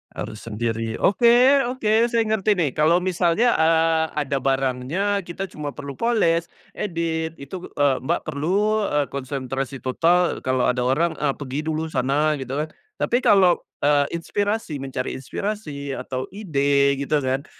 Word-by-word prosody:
Harus 110 - -6
sendiri. 115 0 -2
Oke, 245 +6 +5
oke. 230 -2 +2
Saya 230 -1 +2
ngerti 215 -2 +1
nih. 150 -6 +1
Kalau 160 +3 +3
misalnya, 185 +6 +2
eee, 160 0 +3 0.2
ada 140 0 -1
barangnya, 135 +10 0
kita 175 +2 -5
cuma 150 -1 -5
perlu 140 -1 -7
poles, 185 -8 +1 0.2
edit, 165 -3 -3
itu 175 +7 -8
eee, 140 -2 +3
Mbak 130 - -1
perlu, 200 +8 0
eee, 145 -1 +1
konsentrasi 135 0 -4
total. 170 +8 +1
Kalau 130 -1 +1
ada 125 0 +1
orang, 145 +7 +1
eee, 140 -2 +1
pergi 140 0 -4
dulu 160 0 -2
sana, 145 +1 +1
gitu 130 0 -5
kan. 155 +1 -2 0.3
Tapi 240 - +1
kalau, 185 -5 +4 0.2
eee, 145 -1 +4
inspirasi, 200 -4 -2
mencari 130 -1 -4
inspirasi, 145 -3 -5
atau 130 -1 -4
ide, 140 -8 +1
gitu 145 +2 0
kan, 130 +2 -1
155 Hz, 145 wpm, -23 LUFS, 135-190 Hz, 0.3 s, Oke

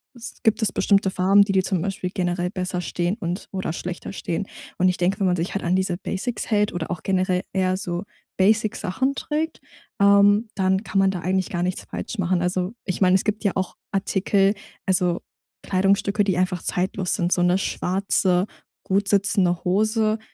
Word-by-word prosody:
s 240 0 -8
gibt 220 0 +2
es 205 -4 +2
bestimmte 200 -1 +2
Farben, 195 +3 +4
die 200 - -2
dir 190 -1 +2
zum 185 -3 -1
Beispiel 185 -1 -3
generell 180 -1 -1
besser 180 -1 -3
stehen 175 +2 -1
und 180 0 -4
oder 190 -4 -3
schlechter 180 +2 -6
stehen. 185 +1 -3 0.3
Und 185 - +3
ich 180 - 0
denke, 180 +4 0
wenn 195 - +2
man 180 - +2
sich 170 +2 -3
halt 200 - -3
an 175 +2 +2
diese 185 -2 0
Basics 200 +7 -4
hält 210 -1 +2
oder 175 -1 -4
auch 175 - -4
generell 185 -1 +1
eher 185 -1 +1
so 175 -2 -3 0.3
Basic 215 +2 +3
Sachen 265 +9 -1
trägt, 310 +3 -3 0.4
ähm, 200 +2 +5
dann 190 +1 +1
kann 195 - -1
man 195 0 +4
da 180 - -4
eigentlich 185 0 0
gar 175 -1 -2
nichts 180 +1 -2
falsch 230 - -6
machen. 180 -1 +1
Also, 180 +3 -1
ich 185 -1 -3
meine, 185 -1 +5
es 190 - +2
gibt 215 +1 -1
ja 200 - +2
auch 190 -1 -2 0.2
Artikel, 195 0 +2 0.3
also 180 -2 +1 0.4
Kleidungsstücke, 200 +2 +2
die 190 -3 0
einfach 180 -1 0
zeitlos 185 0 -1
sind. 175 -2 -1
So 180 - +1
'ne 180 +1 +3
schwarze, 185 -1 +1 0.4
gut 195 +1 0
sitzende 195 -3 +2
Hose, 215 +3 +2
190 Hz, 190 wpm, -23 LUFS, 180-200 Hz, 0.4 s, ähm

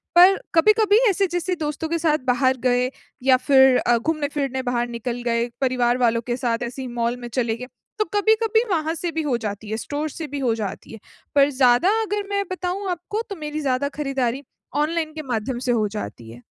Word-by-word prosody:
पर 365 +3 +8 0.2
कभी-कभी 425 +4 +5
ऐसे 390 0 +1
जैसे 355 +1 -2
दोस्तों 305 0 -3
के 335 - 0
साथ 310 -2 +2
बाहर 260 +1 +2
गए, 250 0 +2 0.3
या 260 -1 +5
फिर 265 0 +5
अ, 240 - +2
घूमने-फिरने 285 -1 -2
बाहर 245 -1 -1
निकल 240 +1 -4
गए, 235 0 +1
परिवार 250 -2 +2
वालों 235 -2 +2
के 240 0 -1
साथ 240 -1 -1
ऐसे 245 +3 -5
ही 255 - -5
मॉल 240 0 -2
में 240 - -7
चले 230 -2 -1
गए, 250 +1 -7 0.3
तो 425 - +2
कभी-कभी 440 +2 +3
वहाँ 320 -2 0
से 340 +1 -3
भी 320 - -2
हो 260 -5 0
जाती 210 -1 -6
है, 220 - -2
स्टोर 295 +6 -3
से 310 +2 -6
भी 285 0 -5
हो 250 -4 +1
जाती 205 -4 -6
है। 225 - -9 0.4
पर 280 0 +5
ज़्यादा 255 +4 +4
अगर 415 -1 -2
मैं 400 0 0
बताऊँ 370 +2 -3
आपको, 360 +5 -3
तो 400 - -4
मेरी 305 -2 -5
ज़्यादा 275 0 0
खरीदारी 270 -2 -1 0.4
ऑनलाइन 315 0 -2
के 315 - -5
माध्यम 240 0 -3
से - - +3
हो 220 -3 +2
जाती 160 - -7
है। 120 +1 -13
270 Hz, 205 wpm, -22 LUFS, 240-330 Hz, 0.4 s, पर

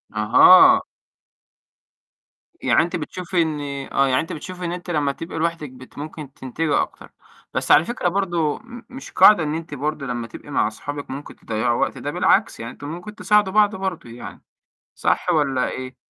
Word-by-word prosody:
أها. 115 +12 +7 1.8
يعني - - +3
أنتِ 175 +2 -4
بتشوفي 180 +2 -2
إن 155 -2 -1 0.3
آه، 135 0 +2
يعني 130 -1 +2
أنتِ 165 - -6
بتشوفي 180 +3 -7
إن 170 - -2
أنتِ 180 0 -7
لمّا 150 -4 0
تبقى 165 +4 -8
لوحدِك 165 -2 -2
بت 130 0 -15
ممكن 150 -1 -8
تنتبهي 145 +4 -1
أكتر، - - -8 0.4
بس - - 0
على 160 - +6
فكرة 240 -4 -2
برضه 175 -5 -1
م 240 0 -12
مش 265 +1 -10
قاعدة 210 -6 +6
إن 150 0 -2
أنتِ 165 -2 -7
برضه 150 +1 -3
لمّا 120 -2 -4
تبقي 115 - -12
مع 120 - +2
أصحابِك 145 +6 -7
ممكن 135 +2 -8
تضيّعوا 115 +2 -1
وقت، - - -1
ده - - -4
بالعكس - - +2
يعني 115 +1 -6
أنتم 145 - -10
ممكن 175 +6 -8
تساعدوا 210 -4 +2
بعضه 210 0 +3
برضه 190 -9 -4
يعني، 120 +1 -10 0.5
صح - - 0
والّا 135 -4 +1
إيه؟ 130 0 -7
155 Hz, 175 wpm, -21 LUFS, 135-180 Hz, 1.8 s, أها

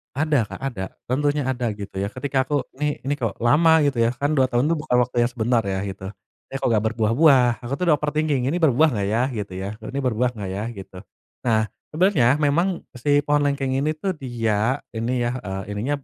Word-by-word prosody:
Ada 145 -6 +1
Kak, - - -9
ada. 125 -8 -3 0.3
Tentunya 145 +3 +1
ada, 125 -2 -1
gitu 100 -1 -9
ya. 100 - -1
Ketika 130 +4 -1
aku, 145 -1 0 0.2
"Nih 150 0 -1
ini 140 - 0
kok 115 -5 -2
lama?" 160 +5 +5
gitu, 140 -3 +1
ya. 115 - +4
Kan 145 +3 -1
2 130 - +4
tahun 125 +4 +1
tuh 165 - +1
buka 150 -4 -3
waktu 125 0 +1
yang 120 - -2
sebentar 120 -1 +1
ya, 95 -1 -1
gitu. 95 -1 -6 0.4
"Eh, - - -9
kok - - 0
nggak 110 -2 +2
berbuah-buah?" 120 +2 +4
Aku 125 - -4
tuh 180 - -2
udah - - +6
overthinking, 150 -3 0
"Ini 155 +6 0
berbuah 155 +1 +4
nggak, 100 -2 -1
ya?" 115 +4 +1
Gitu 105 -4 -5
ya. 95 +1 -4
"Ini 140 +1 -4
berbuah 125 -1 +1
nggak, 100 -2 -4
ya?" 100 +2 -3
Gitu. 95 -4 -10 0.5
Nah, 110 -3 +2 0.2
sebenarnya 160 -6 +3
memang 155 +5 +2 0.3
si 145 +4 +2
pohon 145 0 +2
lengkeng 135 -2 -1
ini 150 +3 +1
tuh 190 +5 -2
dia 115 -3 -1 0.2
ini 120 +2 -1
ya, 120 - 0
eee, 95 -2 -5
ininya 125 +8 -1
p - - -25
125 Hz, 215 wpm, -23 LUFS, 115-145 Hz, 0.5 s, udah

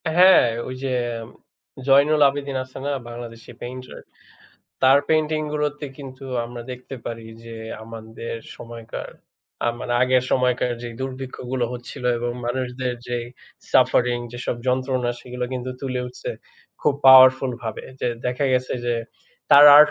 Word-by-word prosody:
হ্যাঁ, 185 -3 +8 0.2
ঐ - - -5
যে 135 -1 -1 0.9
জয়নুল 145 +3 +5
আবেদন 140 0 -4
আছে 130 0 -13
না? 145 - 0 0.2
বাংলাদেশি 120 -1 -9
পেইন্টার। 130 +1 -8 0.8
তার 135 +1 +7
পেইন্টিং 155 0 +2
গুলোতে 150 0 -2
কিন্তু 135 -1 -9 0.2
আমরা 120 0 -7
দেখতে 125 +2 -8
পারি 115 -1 -6 0.2
যে, 115 0 -8 0.3
আমাদের 115 +1 -7 0.2
সময়কার 115 -1 -8 0.6
আমার 120 +1 -4
আগের 130 0 +3
সময়কার 125 -1 +2
যে 120 - -4
দুর্ভিক্ষগুলো 130 -1 -3
হচ্ছিল 125 0 -8
এবং 120 0 -2 0.2
মানুষদের 125 0 -2
যেই 120 -1 -3 0.5
সাফারিং 120 -1 +4
যেসব 120 0 -3
যন্ত্রণা 130 -1 +1
সেগুলো 125 0 -5
কিন্তু 125 0 -3
তুলে 130 -2 -2
উঠছে 125 - -6 0.5
খুব 145 - +2
পাওয়ারফুল 130 0 +8
ভাবে। 110 -2 -5 0.2
যে - - +1 0.2
দেখা 125 +3 0
গেছে 125 0 +1
যে, 120 - +1 0.6
তার 145 0 +10
আর্ট 150 0 +8
125 Hz, 135 wpm, -23 LUFS, 120-135 Hz, 0.9 s, তার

